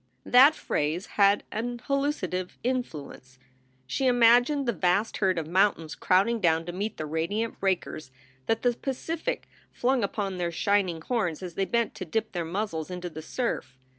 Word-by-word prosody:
That 270 +5 +7
phrase 155 +6 -1 0.2
had 200 +1 +5
an 240 +3 -3
hallucinative 275 - -2
influence. 155 - -4 0.5
She 260 - 0
imagined 245 +3 +4
the 235 - +2
vast 185 +4 +1
herd 190 -3 +1
of 165 - -1
mountains 175 -2 +1
crowding 200 +6 +2
down 165 -2 +2
to 175 - -4
meet 200 +5 -4
the 155 - -3
radiant 170 +9 -2
breakers 180 -6 -2 0.4
that 225 - 0
the 245 -1 +3
Pacific 320 - -4 0.2
flung 255 -1 +1
upon 195 -2 -2
their 170 -1 -1
shining 185 -2 +1
horns 190 -5 -1
as 180 -2 -6
they 195 +3 0
bent 235 +2 0
to 185 - -6
dip 220 +6 -2
their 175 -4 -2
muzzles 170 -2 -3
into 180 -1 -5
the 155 0 -7
surf. 155 - -3
195 Hz, 165 wpm, -27 LUFS, 170-235 Hz, 0.5 s, That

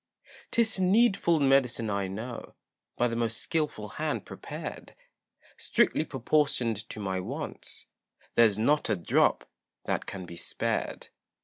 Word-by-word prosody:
'Tis 225 -4 +3
needful 190 -4 +4
medicine 130 -5 +3
I 100 -1 -1
know, 115 +6 -6 0.4
By 120 - +3
the 115 - -3
most 115 -1 0
skilful 150 -10 -1
hand - - -3
prepared, - - -7 0.6
Strictly 155 - +2
proportioned 125 -6 0
to - - -7
my 95 -2 -2
wants, 90 - -6 0.5
There's 110 -4 +5
not 145 +7 +2
a 105 - +3
drop 85 - +2 0.4
that - - -1
can 95 -2 -6
be 85 -1 -10
spared. - - -3
115 Hz, 125 wpm, -29 LUFS, 105-150 Hz, 0.6 s, There's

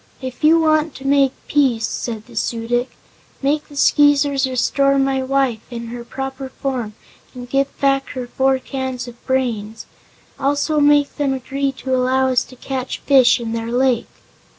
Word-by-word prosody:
"If 260 +2 -7
you 320 +2 +6
want 310 -1 +2
to 270 - -10
make 275 -1 +3
peace," 255 -6 +2
said 225 -2 -4
the 240 - -15
Su 230 +1 -2
dic, 245 +2 0 0.5
"make 295 +2 0
the 290 - -14
Skeezers 285 -1 +3
restore 275 +2 +2
my 270 -1 +1
wife 265 -3 0
to 240 - -6
her 235 +1 -7
proper 270 +1 -6
form 250 -6 -4 0.4
and 245 0 -8
give 275 +2 +1
back 275 -1 +1
her 255 -1 -4
four 265 +2 +1
cans 260 -2 -5
of 240 0 -12
brains. 225 -5 -2 0.5
Also 290 +2 +1
make 290 -1 +3
them 275 -2 0
agree 275 +2 -2
to 260 0 -4
allow 260 +1 +2
us 250 - +2
to 255 - -15
catch 260 0 -4
fish 265 -3 +5
in 230 -1 -4
their 230 0 -3
lake." 250 -1 +1
265 Hz, 170 wpm, -19 LUFS, 245-275 Hz, 0.5 s, you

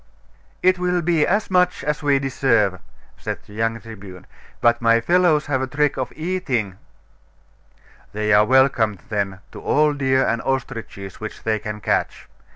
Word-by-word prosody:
'It 185 0 +4
will 180 -1 0
be 165 -2 +2
as 200 +1 0
much 180 +1 +2
as 150 +1 -2
we 145 -2 +3
deserve,' 115 -8 +1 0.4
said - - -4
the 105 - -15
young 115 +1 -1
Tribune: 100 -5 -11 0.3
'but 120 0 +3
my 115 0 +4
fellows 165 +2 +3
have 135 -2 -1
a 130 - -1
trick 145 +2 0
of 130 -2 -3
eating 135 - -2 0.7
' - - -31
'They 105 +1 +1
are 105 +1 +6
welcome, 125 -5 +3
then, 100 -2 -2
to - - -10
all 150 0 +2
deer 135 -2 +1
and 115 - 0
ostriches 115 -7 -4
which 110 0 -8
they 110 -1 0
can 105 0 -6
catch. - - -1
130 Hz, 160 wpm, -21 LUFS, 110-150 Hz, 0.7 s, are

